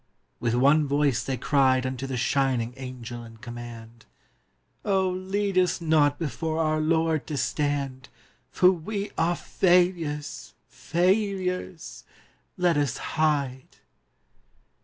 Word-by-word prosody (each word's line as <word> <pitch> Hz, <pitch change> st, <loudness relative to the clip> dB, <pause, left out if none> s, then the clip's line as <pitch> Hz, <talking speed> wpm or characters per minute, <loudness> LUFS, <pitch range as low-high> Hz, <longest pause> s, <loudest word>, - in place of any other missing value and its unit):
With 120 Hz, -1 st, 0 dB
one 140 Hz, +4 st, +4 dB
voice 140 Hz, -3 st, +1 dB
they 135 Hz, -1 st, -2 dB
cried 130 Hz, 0 st, +2 dB
Unto 130 Hz, +1 st, -3 dB
the 130 Hz, -1 st, -3 dB
shining 125 Hz, -2 st, +1 dB
Angel 125 Hz, -3 st, -7 dB
in 115 Hz, -1 st, -13 dB
command: 120 Hz, 0 st, -10 dB, 0.8 s
'Oh, 190 Hz, -2 st, +2 dB
lead 190 Hz, +1 st, 0 dB
us 180 Hz, -1 st, +1 dB
not 155 Hz, -3 st, +3 dB
before 160 Hz, 0 st, -3 dB
our 155 Hz, -1 st, +1 dB
Lord 160 Hz, -3 st, +1 dB
to 150 Hz, -, -3 dB
stand, 140 Hz, -2 st, -2 dB, 0.4 s
For 180 Hz, 0 st, +5 dB
we 200 Hz, +4 st, -4 dB
are 170 Hz, +2 st, +1 dB
failures, 175 Hz, -6 st, 0 dB
failures! 185 Hz, -1 st, -1 dB, 0.5 s
Let 175 Hz, -3 st, +2 dB
us 145 Hz, -3 st, 0 dB, 0.2 s
hide. 140 Hz, -5 st, 0 dB
150 Hz, 115 wpm, -26 LUFS, 130-175 Hz, 0.8 s, For